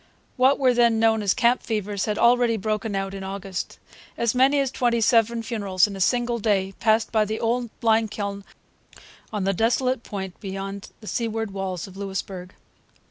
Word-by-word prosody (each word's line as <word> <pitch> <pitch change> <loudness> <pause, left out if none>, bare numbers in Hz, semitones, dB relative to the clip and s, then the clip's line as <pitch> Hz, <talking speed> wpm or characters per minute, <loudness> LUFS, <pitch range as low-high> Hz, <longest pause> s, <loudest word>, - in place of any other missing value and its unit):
What 260 +2 +4
were 255 -2 +3
then 235 -2 +3
known 225 -1 +3
as 200 -2 +1
camp 240 +1 +3
fevers 205 -3 -2
had 210 -1 -2
already 240 -1 +4
broken 215 0 -2
out 195 0 -2
in 195 -1 -6
August. 190 -1 -5 0.4
As 235 -2 +1
many 265 +3 +4
as 270 -2 0
twenty 240 -3 +1
seven 230 0 +3
funerals 200 -5 +1
in 205 -2 -6
a 195 - -6
single 240 +3 +1
day 195 -3 0
passed 220 0 +2
by 220 -2 +3
the 215 +1 -3
old 235 +1 0
lime 225 0 +3
kiln 200 -1 -5 0.9
on 210 -3 -2
the 195 +1 +1
desolate 245 +4 +1
point 190 -5 -7
beyond 195 0 -6
the 215 - -11
seaward 225 -2 -2
walls 190 -2 -4
of 190 -1 -13
Louisbourg. 190 -2 -5
215 Hz, 180 wpm, -24 LUFS, 195-235 Hz, 0.9 s, What